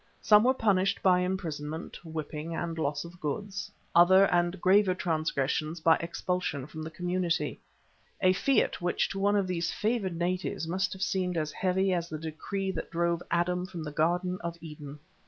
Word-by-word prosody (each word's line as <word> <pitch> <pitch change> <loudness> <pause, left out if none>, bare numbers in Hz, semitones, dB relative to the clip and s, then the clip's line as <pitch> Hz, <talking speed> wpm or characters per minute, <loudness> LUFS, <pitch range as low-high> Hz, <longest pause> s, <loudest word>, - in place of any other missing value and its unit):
Some 210 0 +6
were 260 +1 +4
punished 195 -5 +1
by 180 -1 +5
imprisonment, 165 -5 -4
whipping, 160 0 -5
and 165 0 -3
loss 145 0 -1
of 170 +1 -12
goods, 195 +6 -4 0.2
other 185 +3 +7
and 175 +1 +1
graver 185 +1 +4
transgressions 155 -2 -1
by 160 0 +5
expulsion 170 -4 -2
from 155 +2 -8
the 160 - -5
community, 175 -2 -1 0.6
a 185 0 +4
fiat 265 0 +1
which 175 0 0
to 195 - -4
one 205 +1 +3
of 200 -2 +2
these 175 -2 -1
favoured 210 -5 -1
natives 180 -1 -2
must 185 +3 0
have 190 +1 -4
seemed 180 -3 0
as 155 -1 -1
heavy 190 +2 +1
as 170 -1 -2
the 155 - -4
decree 175 +5 -3
that 180 - -5
drove 170 0 0
Adam 180 +1 0
from 170 -4 -6
the 150 - -5
Garden 175 +4 0
of 170 0 -4
Eden. 150 -3 -9
175 Hz, 175 wpm, -29 LUFS, 160-185 Hz, 0.6 s, other